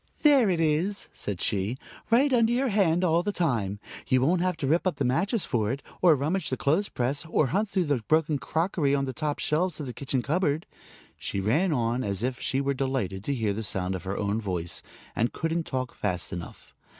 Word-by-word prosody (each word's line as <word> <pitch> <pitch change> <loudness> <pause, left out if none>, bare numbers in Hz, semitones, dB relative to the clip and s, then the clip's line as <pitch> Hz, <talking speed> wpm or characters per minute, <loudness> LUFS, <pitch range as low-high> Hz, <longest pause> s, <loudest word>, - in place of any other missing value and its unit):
"There 280 -8 +6
it 175 -3 +1
is," 165 +6 0
said 100 -4 -5
she, 105 +5 0 0.3
"right 265 +4 +4
under 230 -2 +4
your 255 +2 +1
hand 185 -4 +2
all 170 -1 +3
the 205 - -1
time. 115 - 0 0.3
You 130 - +3
won't 170 +6 +3
have 180 -2 0
to - - -3
rip 165 +7 +2
up 185 - 0
the - - -1
mattress 190 - +1
for 110 -2 0
it, 135 +2 -4 0.2
or 170 -4 +6
rummage 155 +8 -1
the 130 - -1
clothes 165 +9 +1
press, 135 +4 -1
or 155 -5 +2
hunt 205 +2 +1
through 190 -2 +1
the 145 -6 0
broken 155 -2 +2
crockery 160 -4 0
on 140 -1 0
the 130 - -4
top 150 +1 -2
shelves 160 +1 0
of 150 - -4
the 125 - -5
kitchen 130 -2 -2
cupboard," 155 +1 0 0.5
she 100 - -3
ran 145 - +2
on, 120 -2 0
as 100 +1 -3
if 125 0 -1
she 135 - -1
were 140 0 0
delighted 130 -8 -2
to 140 - 0
hear 110 -5 0
the 110 - -3
sound 95 -3 -1
of 95 0 -5
her 95 +1 -3
own 105 +2 -1
voice, 90 -5 -3 0.3
and 115 - 0
couldn't 165 0 -2
talk 130 -2 -3
fast 90 -4 -3
enough. 85 -1 -8
140 Hz, 220 wpm, -27 LUFS, 115-175 Hz, 0.5 s, There